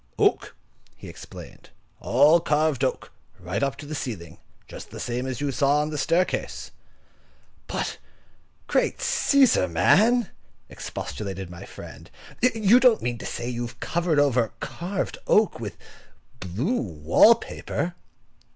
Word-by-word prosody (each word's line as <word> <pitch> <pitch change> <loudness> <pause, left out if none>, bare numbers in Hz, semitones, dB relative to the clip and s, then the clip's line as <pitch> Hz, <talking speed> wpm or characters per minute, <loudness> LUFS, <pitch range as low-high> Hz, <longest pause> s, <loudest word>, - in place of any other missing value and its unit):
"Oak," - - +1 0.4
he - - -12
explained. - - -12 0.3
"All 155 +4 +5
carved 150 -4 +1
oak, 130 - -2 0.3
right 90 +2 -3
up 140 -3 0
to 145 - -9
the 150 - -6
ceiling, 95 - -6 0.3
just - - -10
the - - -9
same 125 +2 -3
as 130 -1 -4
you 145 -1 0
saw 140 +2 +2
on 150 +1 -3
the 150 - -3
staircase." 175 +7 -1 1.0
"But, - - -3 0.7
great - - +1
Cæsar! 280 - +3
man," 220 - +3 0.4
expostulated 95 +3 -6
my 85 - -9
friend; - - -11 0.3
"you 225 -1 +4
don't 250 -4 +4
mean 120 -1 -2
to - - -6
say 120 - -4
you 120 -1 -3
have - - -14
covered 170 -2 0
over 130 -6 +2
carved 185 +3 -4
oak 215 0 +3
with 105 -6 -6 0.6
blue 120 - -2
wall 85 - +5
paper?" 180 -5 -4
145 Hz, 135 wpm, -25 LUFS, 115-185 Hz, 1.0 s, All